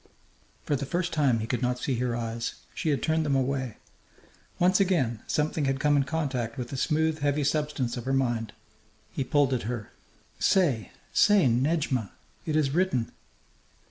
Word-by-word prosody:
For 145 - 0
the 140 0 -3
first 175 +2 -1
time 135 -7 +2
he - - -2
could 120 +2 -2
not 125 0 0
see 130 - -2
her 125 -1 -1
eyes. 115 0 -3 0.2
She 160 - -2
had 145 - 0
turned 160 0 +1
them 145 -3 +1
away. 130 -3 -1 0.8
Once 185 +2 +4
again 155 - +1
something 150 0 0
had 135 0 0
come 145 +1 +3
in 140 -1 +3
contact 135 -6 -2
with 125 -2 -4
the - - -5
smooth, 160 +3 +1
heavy 145 0 +1
substance 145 -4 -1
of 120 - -6
her 135 - -1
mind. 120 -5 0 0.6
He 135 - -2
pulled 140 0 +2
at 120 -3 -2
her. 120 -4 -5 0.5
"Say! 140 - +2 0.2
Say, 205 -5 +5
Nedjmà!... 130 - +1 0.4
It 155 - 0
is 150 -3 +2
written!" 170 -8 +1
135 Hz, 175 wpm, -27 LUFS, 125-155 Hz, 0.8 s, Say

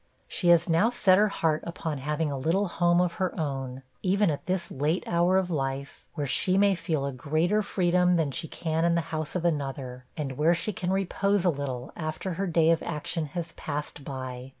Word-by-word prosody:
She 180 - -1
has 170 -1 +6
now 170 +7 +4
set 200 -6 +4
her 210 - +5
heart 160 -6 0
upon 165 -4 -4
having 150 +2 -1
a - - -2
little 175 +9 +1
home 175 0 +2
of 180 -1 +2
her 185 -1 -1
own, 135 -3 -3 0.2
even 195 -1 +2
at 145 - -5
this 185 -1 -1
late 150 +6 0
hour 175 +2 +3
of 185 -2 0
life, 135 -2 -3
where 145 -3 -1
she 185 +7 +2
may 200 0 +5
feel 165 -5 -1
a 140 - -2
greater 155 +10 +1
freedom 180 -2 +2
than 160 -4 +1
she 160 - -4
can 160 +1 -2
in 170 0 +3
the 170 - +2
house 155 +1 -3
of 175 -1 -1
another, 135 -5 -2
and 135 -4 -4
where 165 +3 +4
she 210 +5 -3
can 180 0 -3
repose 195 0 +1
a 175 - +5
little, 135 -4 -4
after 160 +3 -4
her 195 +4 -2
day 165 -1 +4
of 165 - +2
action 160 0 -3
has 170 -1 -3
passed 145 -2 -5
by. 130 -2 -6
165 Hz, 210 wpm, -27 LUFS, 145-180 Hz, 0.2 s, has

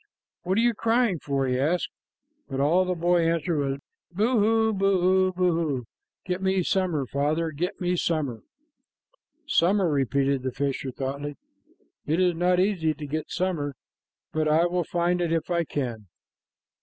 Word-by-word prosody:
"What 185 +2 -1
are - - +4
you 240 0 +3
crying 230 -4 +1
for?" 140 -1 -1
he 125 -1 0
asked, 165 +6 +1 0.6
but 135 - -3
all 170 +7 +3
the 180 0 -1
boy 175 0 +2
answered 165 -1 0
was 135 -1 -1 0.3
"Boo 220 +6 +2
hoo, 220 +1 +3
boo 190 -1 +3
hoo! 165 -8 0 0.4
Get 180 +1 -2
me 190 -1 +1
summer, 175 -7 0
father, 150 +5 -1
get 170 +5 -3
me 180 0 0
summer!" 150 -10 -1 1.0
"Summer," 195 - +3
repeated 140 -1 +1
the 130 0 -2
fisher 135 0 -2
thoughtfully. 140 +3 -4 0.7
"It 160 +4 +1
is 180 -1 +3
not 180 +2 +2
easy 180 -5 +1
to 150 - -7
get 155 +2 -4
summer, 165 -6 -2 0.6
but 155 0 +1
I 155 +3 +4
will 175 0 0
find 175 +1 0
it 170 -2 0
if 165 +1 -1
I 170 -1 +1
can." 120 -9 -4
170 Hz, 155 wpm, -26 LUFS, 145-185 Hz, 1.0 s, are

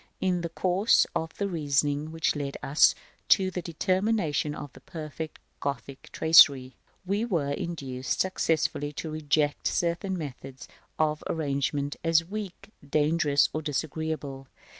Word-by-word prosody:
In 180 -2 0
the 170 - -3
course 185 +5 +3
of 160 0 -3
the 200 - -1
reasoning 145 -3 0
which 160 -1 0
led 140 -1 -4
us 140 +3 +5 0.3
to 190 -1 +4
the 180 - -3
determination 180 -3 0
of 145 - -8
the - - -14
perfect 155 -1 -7 0.2
Gothic 140 -1 -5
tracery, 140 -5 +6 0.3
we 200 +4 0
were 165 -11 0
induced 135 -5 -3
successively 160 -5 0
to 155 +2 -5
reject 150 -1 0
certain 175 +3 -1
methods 135 -3 -8 0.3
of 155 -1 0
arrangement 145 -1 -1
as 165 0 +3
weak, 200 +1 -7 0.2
dangerous, 150 -1 +3
or 155 - -2
disagreeable. 150 -2 -4
155 Hz, 130 wpm, -27 LUFS, 145-175 Hz, 0.3 s, tracery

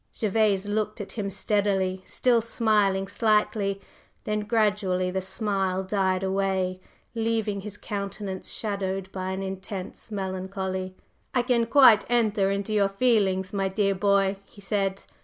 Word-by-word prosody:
Gervase 210 -2 +2
looked 215 +1 -2
at 205 - -6
him 205 -3 -3
steadily, 195 -2 0
still 240 -2 +2
smiling 210 -4 +1
slightly; 210 -1 +1 0.4
then 210 0 -1
gradually 205 -4 +1
the 190 +1 -1
smile 190 -1 -1
died 190 -1 0
away, 190 -1 0 0.3
leaving 225 -3 -1
his 210 +1 -7
countenance 200 -2 -5
shadowed 195 -2 -3
by 185 -1 -4
an 190 +1 -3
intense 190 +2 -6
melancholy. 190 -1 -4 0.4
"I 250 - +3
can 240 -2 +2
quite 235 -4 +7
enter 215 -5 +2
into 200 +2 -2
your 200 -2 +3
feelings, 195 -4 +1
my 195 -1 0
dear 195 0 +1
boy!" 195 0 +2
he 205 - -18
said. 195 -1 -1
200 Hz, 135 wpm, -26 LUFS, 190-215 Hz, 0.4 s, quite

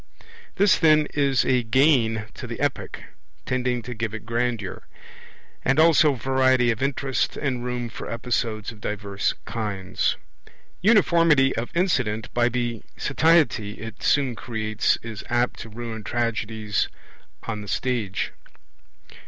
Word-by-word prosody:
This 200 0 +4
then 155 -2 +5
is 140 -3 +2
a 125 -1 +3
gain 115 -3 +3
to - - -8
the - - -6
Epic, - - -2 0.4
tending 125 -1 -1
to 125 - -6
give 110 -1 -3
it 110 - -8
grandeur, 115 -4 -2 0.8
and 135 +3 +2
also 160 -2 +6
variety 130 -1 +3
of 115 - -4
interest 135 -1 -1
and 130 -4 -2
room 125 -1 -3
for 115 - -8
episodes 115 -2 -2
of 110 -2 -15
diverse 100 -1 -2
kinds. 105 -5 -2 0.6
Uniformity 170 - +4
of 115 +1 -3
incident 125 - 0
by 120 0 +3
the 120 -2 -2 0.2
satiety 140 -9 +2
it 110 +2 -9
soon 135 -4 +2
creates 110 -2 -1
is 110 -2 -7
apt 120 +1 0
to 115 - -8
ruin 110 0 -6
tragedies 110 -3 -1 0.6
on 110 -2 -4
the 105 - -9
stage. 105 -1 -1
120 Hz, 130 wpm, -24 LUFS, 110-135 Hz, 0.8 s, also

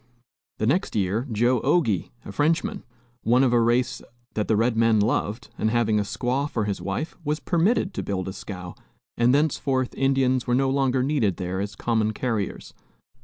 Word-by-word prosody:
The 110 - -1
next 165 - +1
year, 105 +5 0
Joe 120 +3 +2
Ogie, 135 - +1 0.2
a - - -7
Frenchman, 165 - 0 0.4
one 125 +3 +3
of 125 -2 +3
a 120 - +4
race 120 +2 +1 0.3
that 105 - -1
the 110 - +3
red 115 +2 +2
men 115 -1 +4
loved, 105 +1 -1
and 110 - +2
having 110 -2 +2
a - - +2
squaw 125 +7 -1
for 110 -6 -1
his 100 -2 -3
wife, 100 +12 -3
was 150 +1 -1
permitted 185 +3 +1
to - - -3
build 95 -2 -3
a 95 - -4
scow, 90 -3 -7 0.4
and 120 +1 +3
thenceforth 135 -3 +1
Indians 135 -2 +1
were 120 - +2
no 135 +1 +2
longer 135 -2 +1
needed 130 - +1
there 90 0 -3
as 100 0 -4
common 110 -2 0
carriers. 110 -4 -3
120 Hz, 180 wpm, -25 LUFS, 105-135 Hz, 0.4 s, a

